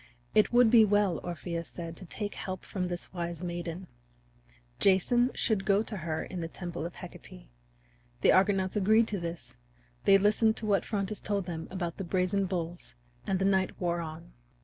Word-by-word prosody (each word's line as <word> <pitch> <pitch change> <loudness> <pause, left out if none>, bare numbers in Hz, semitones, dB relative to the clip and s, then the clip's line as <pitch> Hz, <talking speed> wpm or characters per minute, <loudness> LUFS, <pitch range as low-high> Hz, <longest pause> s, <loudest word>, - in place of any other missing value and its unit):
It - - +4
would 240 -2 +5
be 230 -2 +8
well, 205 -5 +2
Orpheus 170 -1 -4
said, 165 -1 -7
to 185 - -9
take 205 +3 -4
help 185 -1 -5
from 185 -2 -3
this 175 +1 -6
wise 170 -1 -4
maiden; 175 +1 -4 0.9
Jason 240 +6 +4
should 215 -5 +1
go 200 +1 +3
to 220 -2 -6
her 160 -2 -3
in 180 -2 -6
the 165 - -3
temple 175 -1 -5
of 170 - -12
Hecate. - - -11 0.7
The - - +6
Argonauts 190 0 +3
agreed 215 +3 +4
to 205 - -2
this; 170 - -6 0.5
they 195 - +7
listened 215 +2 +3
to 220 - -4
what 200 -2 +2
Phrontis 205 -1 -2
told 200 -3 -1
them 165 -2 -5
about 175 -3 -4
the 195 - -4
brazen 185 +2 0
bulls, 175 -1 -5 0.3
and 195 - +1
the 190 - 0
night 190 -1 +1
wore 175 -1 0
on. 165 +1 -8
185 Hz, 180 wpm, -30 LUFS, 170-205 Hz, 0.9 s, be